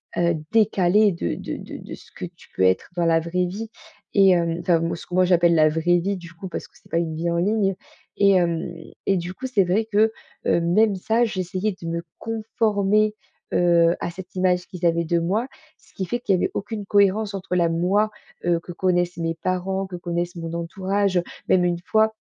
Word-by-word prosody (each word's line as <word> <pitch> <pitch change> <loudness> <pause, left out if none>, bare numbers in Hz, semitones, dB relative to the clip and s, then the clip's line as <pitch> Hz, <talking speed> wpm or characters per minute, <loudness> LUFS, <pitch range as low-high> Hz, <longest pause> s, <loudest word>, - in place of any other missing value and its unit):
heu, 170 0 +2 0.2
décalée 210 -1 +4
de 170 - -2
de - - -5
de - - -8
de - - -8
ce - - -18
que - - -9
tu - - -14
peux - - -2
être 95 0 +2
dans 175 -1 +1
la 165 -1 +4
vraie 175 +2 -1
vie. 215 +5 -6 0.4
Et 195 -1 +6
hem, 170 -2 +2
enfin, 175 -1 +3
m 165 - -1
ce 170 - -10
que 180 - -5
moi 185 0 +5
j'appelle 170 -1 +4
la 155 -1 +5
vraie 165 +3 +2
vie, 195 +4 -1
du 170 -2 -11
coup, 180 +3 -8
parce 175 - -6
que - - -34
c'est - - -23
pas 165 - +2
une 160 -2 -2
vie 170 +2 -1
en 170 - 0
ligne. 195 +1 +1 0.4
Et 200 -1 +5
hem 170 -2 +1 0.4
et 195 - +3
du 175 +1 -4
coup, 260 +7 -5
c'est 225 -7 +3
vrai 190 +5 +1
que, 215 +2 +4 0.3
heu, 170 - +3
même 200 +5 +3
ça, 220 +5 +1
j'essayais 185 0 -2
de 165 - -6
me 170 0 -3 0.2
conformer, 215 -2 +1 0.4
heu, 170 -1 +4
à 170 - -3
cette 180 +2 -11
image 185 -1 +1
qu'ils 180 -1 -5
avaient 170 0 +3
de 170 +2 +1
moi. 200 +9 0 0.3
Ce - - -25
qui 190 - -2
fait 240 +7 -2
qu'il 200 -5 +1
y - - +1
avait - - 0
aucune 210 0 -4
cohérence 200 +1 +2
entre 190 -2 -3
la 170 -2 +3
moi, 190 +6 +1 0.3
heu, 175 -1 +2
que 175 - -10
connaissent 175 -1 0
mes 165 -1 -1
parents, 185 +2 -2
que 185 - -7
connaissent 175 0 -3
mon 165 -1 -5
entourage. 190 +3 -1
Heu, 175 - +2 0.3
même 180 -1 +4
une 175 -1 0
fois, 220 +3 +2
180 Hz, 225 wpm, -23 LUFS, 170-200 Hz, 0.4 s, Et